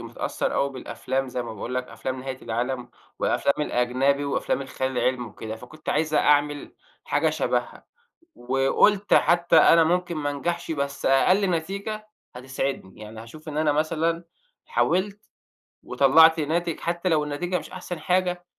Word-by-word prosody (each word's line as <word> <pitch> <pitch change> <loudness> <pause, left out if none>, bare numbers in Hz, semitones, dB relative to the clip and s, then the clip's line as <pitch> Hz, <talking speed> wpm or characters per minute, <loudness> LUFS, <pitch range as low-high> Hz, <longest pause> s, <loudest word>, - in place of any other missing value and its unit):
متأثّر - - -3
أوي 140 - +1
بالأفلام 130 0 -3
زي 125 0 -3
ما 115 -2 -7
باقول 120 +5 -5
لك 125 0 -2
أفلام 130 +3 -5
نهاية 130 0 -6
العالم، 120 +2 -3 0.3
والأفلام 140 - +1
الأجنبي 130 +4 +1
وأفلام 140 0 -1
الخيال 130 0 -3
العلمي 125 -2 0
وكده، 110 +1 -7
فكنت 155 +6 -13
عايز 155 0 0
أعمل 145 -1 +2 0.3
حاجة - - +1
شبهها، - - -2 0.5
وقُلت 135 +11 +2
حتّى 170 0 +4
أنا 165 0 +7
ممكن 175 +1 0
ما 145 -1 -1
أنجحش 170 +4 -3
بس 140 -2 -3
أقل 185 +9 +4
نتيجة 200 +6 -3 0.3
هتسعدني، 130 -5 -4
يعني 110 +1 -9
هاشوف 155 +8 -13
إن 150 - -5
أنا 155 -1 +2
مثلًا 165 +2 0 0.4
حاولت، 200 - 0 0.6
وطلَّعت 160 +4 +5
ناتج 165 +2 -1
حتى 175 +2 -2
لو 155 -2 +2
النتيجة 175 +5 -2
مش - - -11
أحسن 180 -2 -6
حاجة، 180 +1 0
150 Hz, 145 wpm, -25 LUFS, 130-170 Hz, 0.6 s, أنا